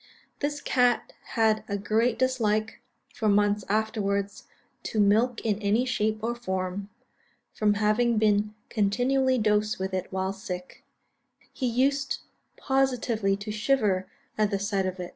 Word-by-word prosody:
This 290 0 -2
cat 245 -2 +1 0.2
had 220 -1 +3
a 200 - -2
great 220 +4 +1
dislike, 220 -4 0 0.3
for 215 - 0
months 205 0 +3
afterwards, 200 -2 -1 0.4
to 215 - -3
milk 220 +4 +3
in 215 -1 -1
any 215 +5 +2
shape 220 -3 -1
or 235 +1 0
form; 190 -3 -3 0.6
from 210 -1 +2
having 215 +3 +2
been 210 0 +2 0.2
continually 255 +5 +2
dosed 210 -1 +1
with 190 0 -4
it 185 -1 -3
while 190 0 -1
sick, 185 -3 -7 0.7
he 260 - -2
used 275 +3 +1 0.4
positively 250 -7 +1
to 205 +1 -6
shiver 210 -4 +1 0.3
at 210 -1 +3
the 200 - 0
sight 195 -1 -1
of 185 0 -5
it. 180 -1 -5
215 Hz, 140 wpm, -27 LUFS, 200-240 Hz, 0.7 s, had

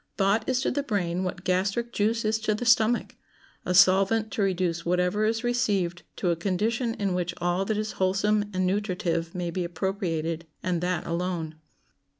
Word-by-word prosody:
Thought 200 +3 +2
is 255 0 +1
to - - 0
the 285 - 0
brain 190 -8 -1
what 180 - -4
gastric 195 +6 0
juice 220 +2 +1
is 220 +1 +1
to 215 -1 0
the 245 - -4
stomach—a 230 -5 0
solvent 195 +4 +5
to - - -2
reduce 180 -3 0
whatever 180 +4 +1
is 225 +2 0
received 205 -8 0
to 180 - 0
a - - +1
condition 220 +7 -1
in 200 -2 -1
which 180 -1 -2
all 175 +2 0
that 215 +1 -1
is 215 0 -2
wholesome 205 +2 +2
and 185 -1 0
nutritive 180 -4 -1
may 175 -1 -2
be 180 +1 -2
appropriated, 170 -2 -2 0.2
and 175 -2 0
that 180 -1 -1
alone. 170 -2 -2
190 Hz, 170 wpm, -26 LUFS, 175-215 Hz, 0.2 s, solvent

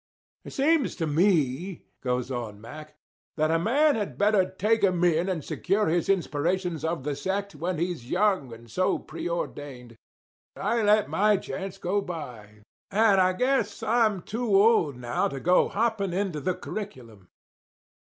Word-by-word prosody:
"It - - -10
seems 295 0 +2
to 165 - -2
me," 160 0 +1 0.2
goes 125 0 -2
on 115 -5 -5
Mack, 150 +7 -11 0.4
"that 155 0 +2
a 165 - +2
man 285 - +3
had 210 -3 -3
better 205 -3 +3
take 215 +4 0
'em 180 -3 +2
in 175 +1 +2
and 165 -6 -3
secure 210 -2 0
his 170 +2 0
inspirations 175 -1 0
of 160 -4 -2
the 145 0 -2
sect 195 +7 -3
when 170 +4 -3
he's 170 -7 -3
young 185 - +1
and 115 +1 -12
so 185 +12 0
preordained. 140 -8 -6 0.6
I 235 0 0
let 210 0 +4
my 210 0 +3
chance 190 0 -6
go 195 +2 -1
by; 120 - -8 0.3
and 205 -2 +4
I 185 0 +3
guess 240 0 0
I'm 220 -4 +2
too 225 -2 -1
old 200 - +3
now 120 -1 -1
to 135 - -6
go 180 +6 +3
hopping 215 -4 0
into 185 -4 -1
the 180 +4 -1
curriculum." 120 - -8
180 Hz, 155 wpm, -26 LUFS, 145-205 Hz, 0.6 s, let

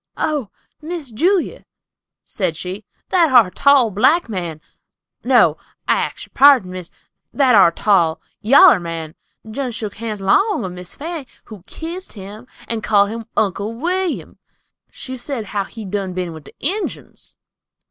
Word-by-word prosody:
"Oh, 290 -9 -1 0.3
Miss 315 -4 -6
Julia!" 350 - 0 0.6
said 185 -6 -2
she, 185 +5 -6 0.2
"that 340 -5 +3
ar' 235 -8 +6
tall, 275 -3 +4
black 260 - +3
man—no, 170 -7 -1 0.3
I - - +4
ax - - -3
yer - - -27
pardon, 270 -9 +6
miss—that 185 +8 -3
ar' 190 -5 +7
tall, 170 -4 +2 0.2
yaller 265 - +7
man, 165 -2 -6 0.3
done 250 +3 -4
shook 215 -3 -6
hands 220 -2 -5
'long 395 - +2
of 185 - -4
Miss 180 0 -9
Fanny, 315 -2 -6 0.2
who 215 -4 -12
kissed 345 +4 -7
him, 210 +4 -10 0.2
and 225 -1 -3
called 205 -1 +3
him 230 0 -7
Uncle 205 +2 0
William. 355 +6 -2 0.5
She 260 - -7
said 245 -2 -4
how 200 -2 -1
he 220 0 -9
done 195 -1 -3
been 180 -2 -4
with 160 -3 -11
the - - -15
Injuns." 385 +9 -4
220 Hz, 145 wpm, -19 LUFS, 190-285 Hz, 0.6 s, ar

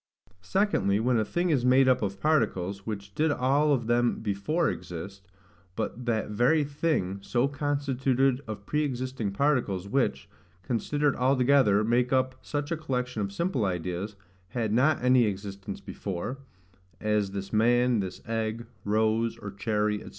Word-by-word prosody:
Secondly, 100 - +1
When 120 +1 +2
a - - +2
thing 175 - 0
is 135 -5 +2
made 130 +1 +5
up 130 -1 +4
of 100 -2 -3
particles, 100 - 0
which 100 -2 -5
did 155 +7 +1
all 145 +3 +2
of 125 -5 +1
them 120 +1 +2
before 110 - 0
exist; 95 +3 -6 0.5
but 120 +6 -4
that 110 -2 0
very 125 +9 +3
thing, 140 - -1
so 120 +6 +1
constituted 135 -2 0
of 105 -2 -6
pre 150 +6 0
existing 130 -6 -2
particles, 100 -6 0
which, 135 +5 0 0.4
considered 145 +6 0
all 130 +2 +2
together, 125 -6 +4
make 120 +3 +2
up 130 0 +2
such 145 +1 -4
a 165 - 0
collection 125 -6 -2
of 100 -1 -2
simple 140 - -1
ideas, 90 +2 -3 0.3
had 110 +1 -2
not 135 +4 +3
any 125 -1 +5
existence 100 -1 -5
before, 100 +8 -5 0.6
as 105 -2 +1
this 100 +1 -6
man, 120 +2 +3
this 95 -2 -4
egg, 115 0 -2 0.2
rose, 110 +2 +1
or 105 -3 -7
cherry, 105 +1 0
&c. - - -10
120 Hz, 155 wpm, -28 LUFS, 100-135 Hz, 0.6 s, made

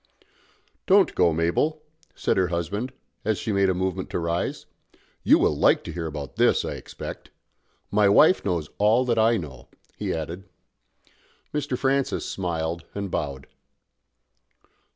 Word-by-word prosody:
"Don't 195 0 +5
go, 85 -2 +3
Mabel," 85 - 0 0.3
said - - 0
her 95 -1 +2
husband, 90 +9 -3 0.3
as 110 -1 0
she 110 - -2
made 100 -1 +3
a 95 - +1
movement 95 0 -2
to - - -2
rise. 85 0 -2 0.6
"You - - +5
will - - +2
like - - +3
to 85 - -6
hear 85 0 -4
about 75 -4 -7
this, - - +3
I - - -3
expect. - - -8 0.6
My 105 0 +4
wife 155 - +5
knows 85 -6 -2
all 110 +5 +4
that 120 -2 +1
I 115 +1 +4
know," 65 -8 -8 0.3
he - - -3
added. 85 +4 -5 1.0
Mr. 145 -4 -2
Francis 135 +1 0
smiled 85 -2 -3
and 100 -2 -4
bowed. 70 -3 -3
95 Hz, 145 wpm, -25 LUFS, 85-110 Hz, 1.0 s, Don't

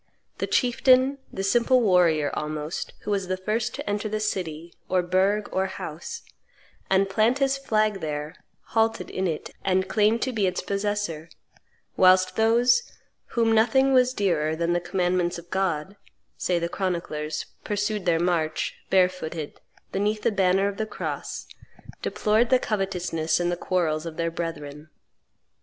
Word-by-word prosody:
The - - -1
chieftain, 260 +2 +3
the 195 - -4
simple 240 +5 +3
warrior 175 -9 +3
almost, 150 +2 -4
who 210 - -4
was 195 -2 0
the 185 0 -1
first 215 +5 -2
to 285 - -7
enter 210 +1 -1
city, 170 -6 -3 0.2
or 185 -1 +2
burgh, 190 +4 +1
or 190 0 +1
house, 165 -3 -7 0.7
and 195 +1 +3
plant 215 +6 +2
his 275 -1 +2
flag 215 -7 0
there 150 -1 -4 0.4
halted 225 0 +1
in 190 0 -1
it 160 -3 -4
and 190 0 +1
claimed 215 +3 +2
to 260 - -2
be 205 -4 +1
its 180 - -1
possessor; 200 -5 -2 0.7
whilst 185 0 +5
those 235 - +4 0.5
"whom 230 -1 +3
nothing 255 +5 +4
was 255 -1 +5
dearer 160 -6 +1
than 170 +1 0
the 175 - +2
commandments 175 0 0
of 170 0 -12
God," 190 -1 -1 0.4
say 180 - 0
the 170 0 -1
chroniclers, 170 -5 -3 0.2
pursued 205 -2 -2
their 165 -1 +3
march, 165 -3 0 0.2
barefooted, 180 -5 0 0.3
beneath 210 +2 -1
the - - +3
banner 195 -1 +2
of 200 -1 -4
the 220 - -2
cross, - - -5 0.6
deplored 220 +3 +1
the 255 - +6
covetousness 185 -8 -1
and 175 0 0
the - - 0
quarrels 170 -3 -1
of 160 -1 -7
their 165 0 -1
brethren. 155 -3 -6
190 Hz, 150 wpm, -25 LUFS, 170-215 Hz, 0.7 s, the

